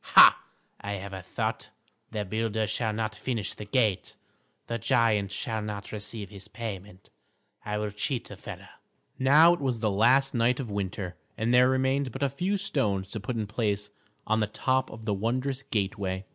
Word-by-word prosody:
Ha! - - +8 0.4
I 100 - -3
have 100 0 -6
a 95 - -5
thought! 90 - -3 0.4
The 105 -2 -3
builder 110 +2 -1
shall 110 +2 0
not 110 0 -2
finish 110 -1 -2
the 105 - -8
gate; 105 -4 +1 0.5
the 115 0 -3
giant 110 -3 +2
shall 110 0 -2
not 105 -1 -5
receive 105 -1 -5
his 100 0 -10
payment. 100 -4 -7 0.5
I 105 0 -2
will 105 0 -2
cheat 115 +4 -2
the - - -8
fellow." - - -9 0.5
Now 150 +6 +7
it 175 - -3
was 130 -4 0
the 110 -2 +1
last 130 +7 +4
night 120 +1 +2
of 120 -6 -4
winter, 95 -2 -3 0.2
and 115 +2 +1
there 125 +1 +6
remained 130 0 +1
but 135 +4 -4
a 140 - +3
few 180 +9 -1
stones 105 - -1
to 110 - -3
put 115 +5 -4
in 110 -2 -1
place 105 -1 -1 0.3
on 110 0 +2
the 105 - +1
top 130 +5 0
of 110 0 -10
the 105 - +1
wondrous 125 +6 -1
gateway. 100 -6 -2
110 Hz, 185 wpm, -28 LUFS, 100-125 Hz, 0.5 s, Ha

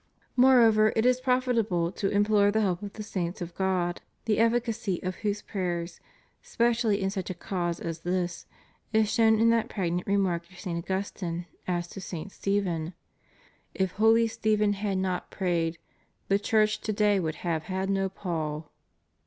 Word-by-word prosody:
Moreover, 230 -4 +6
jt 220 - +2
is 250 0 +3
profitable 235 -10 +1
to 195 +1 -1
implore 205 0 +3
the 220 +2 +1
help 185 -4 0
of 205 -1 -7
the 215 - -6
saints 185 -2 -3
of 175 -2 -6
God, 185 -2 -1 0.2
the 215 -2 +1
efficacy 230 -5 +1
of 185 0 -3
whose 205 -1 -2
prayers, 175 -3 -3 0.4
specially 230 -3 +1
in 195 -1 0
such 190 -3 -4
a 185 - -3
cause 175 -1 -3
as 165 -1 -4
this, 175 0 -2 0.5
is 220 -1 +3
shown 220 -2 +4
in 230 +1 +5
that 230 0 +1
pregnant 180 -3 -2
remark 185 -4 0
of 180 - -15
St. 180 -4 -4
Augustine 185 -3 -3 0.2
as 175 -1 -1
to 195 - -8
St. 185 +1 -6
Stephen: 180 -5 -1 0.4
" - - -31 0.3
If 190 -2 0
holy 225 +3 +4
Stephen 215 -2 +1
had 200 -1 -2
not 185 -1 -2
prayed, 170 -3 -1 0.5
the 195 +1 +3
Church 215 0 +2
to 215 - -2
day 205 -1 +3
would 160 -3 -2
have 160 -2 -1
had 190 0 -2
no 195 0 0
Paul." 160 -5 -4
195 Hz, 170 wpm, -28 LUFS, 175-215 Hz, 0.5 s, Moreover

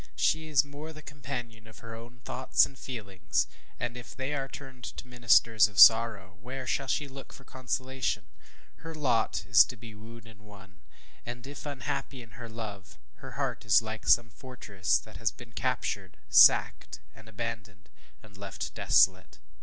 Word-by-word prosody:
She 160 0 +1
is 145 -3 +3
more 145 +2 -9
the 155 0 -12
companion 120 -7 -7
of 110 -2 -15
her 115 - -8
own 120 +2 -12
thoughts - - +3
and 140 - -13
feelings; 95 - -3 0.3
and 120 0 -3
if 125 -1 -10
they 135 +2 -3
are 135 -2 -2
turned 135 -3 -11
to - - -8
ministers 115 -3 +4
of 105 -1 -4
sorrow, 110 -5 +6
where 130 +3 -6
shall 135 +2 -1
she 145 +2 -1
look 135 0 -11
for 135 - -13
consolation? 130 -4 -3 0.5
Her 165 0 -9
lot 120 -9 0
is 100 -4 +8
to 125 - -9
be 115 0 -11
wooed 115 +1 -13
and 110 -2 -16
won; 95 -3 -16 0.4
and 120 +1 -8
if 145 +2 -9
unhappy 135 -2 -5
in 115 - -17
her 115 +4 -10
love, 105 -4 -8 0.2
her - - -10
heart - - -3
is 105 +1 +4
like 110 0 -7
some 115 -1 +4
fortress 105 -8 -2
that 110 -4 -11
has 115 +2 0
been 120 -1 -14
captured, - - -3
and - - -21
sacked, - - +5
and 110 +1 -15
abandoned, 110 -4 -7 0.4
and 105 -2 -17
left 100 -1 -6
desolate. - - +2
115 Hz, 175 wpm, -29 LUFS, 105-130 Hz, 0.5 s, is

